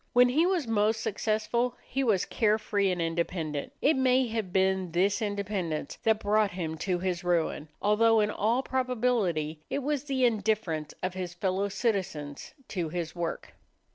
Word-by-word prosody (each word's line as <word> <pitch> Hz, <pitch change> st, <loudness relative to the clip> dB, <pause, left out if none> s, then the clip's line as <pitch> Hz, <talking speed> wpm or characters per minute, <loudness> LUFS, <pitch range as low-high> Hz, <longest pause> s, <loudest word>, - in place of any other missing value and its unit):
When 245 Hz, 0 st, +6 dB
he 315 Hz, +7 st, +3 dB
was 355 Hz, -8 st, 0 dB
most 220 Hz, 0 st, +2 dB
successful 225 Hz, +4 st, 0 dB
he 270 Hz, +1 st, -1 dB
was 210 Hz, -7 st, +2 dB
carefree 210 Hz, -2 st, +1 dB
and 180 Hz, -1 st, -1 dB
independent. 165 Hz, -, -2 dB
It 305 Hz, -, +5 dB
may 260 Hz, 0 st, +3 dB
have 220 Hz, -5 st, -3 dB
been 190 Hz, -2 st, +1 dB
this 195 Hz, +5 st, +2 dB
independence 200 Hz, -7 st, -3 dB
that 220 Hz, -1 st, +2 dB
brought 210 Hz, 0 st, +3 dB
him 170 Hz, -4 st, -4 dB
to 185 Hz, 0 st, 0 dB
his 180 Hz, 0 st, -2 dB
ruin 170 Hz, -3 st, 0 dB, 0.2 s
although 225 Hz, +2 st, +4 dB
in 210 Hz, 0 st, +2 dB
all 230 Hz, +6 st, +1 dB
probability 230 Hz, -, 0 dB
it 280 Hz, -, -2 dB
was 290 Hz, 0 st, -1 dB
the 265 Hz, -3 st, +1 dB
indifference 205 Hz, -9 st, 0 dB
of 185 Hz, 0 st, -1 dB
his 180 Hz, -2 st, -5 dB
fellow 190 Hz, +2 st, 0 dB
citizens 190 Hz, -, -3 dB
to 175 Hz, -5 st, -2 dB
his 165 Hz, 0 st, -4 dB
work. 170 Hz, -1 st, -4 dB
205 Hz, 160 wpm, -29 LUFS, 175-230 Hz, 0.2 s, When